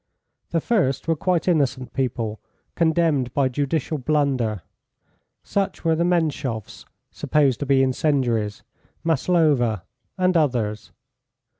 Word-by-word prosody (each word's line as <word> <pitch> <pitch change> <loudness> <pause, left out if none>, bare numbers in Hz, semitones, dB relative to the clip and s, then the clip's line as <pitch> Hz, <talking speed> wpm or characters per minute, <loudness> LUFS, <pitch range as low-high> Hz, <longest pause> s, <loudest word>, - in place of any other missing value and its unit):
The 165 -1 0
first 170 - 0
were 165 - +2
quite 180 +2 0
innocent 135 -7 0
people, 115 -5 -2 0.3
condemned 160 -6 +1
by 135 -2 +2
judicial 145 +3 -1
blunder. 130 - 0 0.8
Such 195 -3 -2
were 165 -1 +3
the 170 - +1
Menshoffs, 140 - -1 0.3
supposed 145 -4 +1
to 145 - -3
be 135 -1 +4
incendiaries, 125 -6 0 0.4
Maslova, 150 - +2 0.3
and 185 -1 +2
others. 120 -9 0
140 Hz, 110 wpm, -23 LUFS, 125-160 Hz, 0.8 s, be